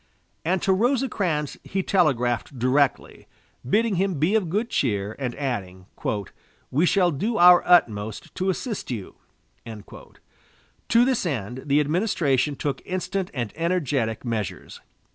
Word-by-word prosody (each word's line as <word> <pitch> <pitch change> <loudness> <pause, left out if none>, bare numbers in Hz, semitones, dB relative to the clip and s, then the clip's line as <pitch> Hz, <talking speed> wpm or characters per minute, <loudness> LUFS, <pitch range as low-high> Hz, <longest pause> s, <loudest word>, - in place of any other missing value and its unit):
And 180 +2 0
to 190 - +3
Rosecrans 205 - 0
he 190 0 -2
telegraphed 125 - +1
directly, 130 +3 0 0.4
bidding 210 - +1
him 190 0 0
be 155 +7 +1
of 210 -6 +1
good 215 +7 -1
cheer, 105 -4 -1
and 125 -3 -3
adding: 95 -10 -4 0.9
"We 155 +7 +2
shall 180 -2 +3
do 210 - -2
our 175 -1 +8
utmost 110 - +2
to 190 +1 -1
assist 215 +3 -3
you." 110 -7 -6 0.5
To 115 - -4
this 260 -2 +1
end 125 - -3
the 140 +1 +3
administration 150 - +1
took 140 -1 -3
instant 185 0 -3
and 120 -5 -3
energetic 145 -10 -1
measures. 110 -5 -4
150 Hz, 125 wpm, -24 LUFS, 125-190 Hz, 0.9 s, our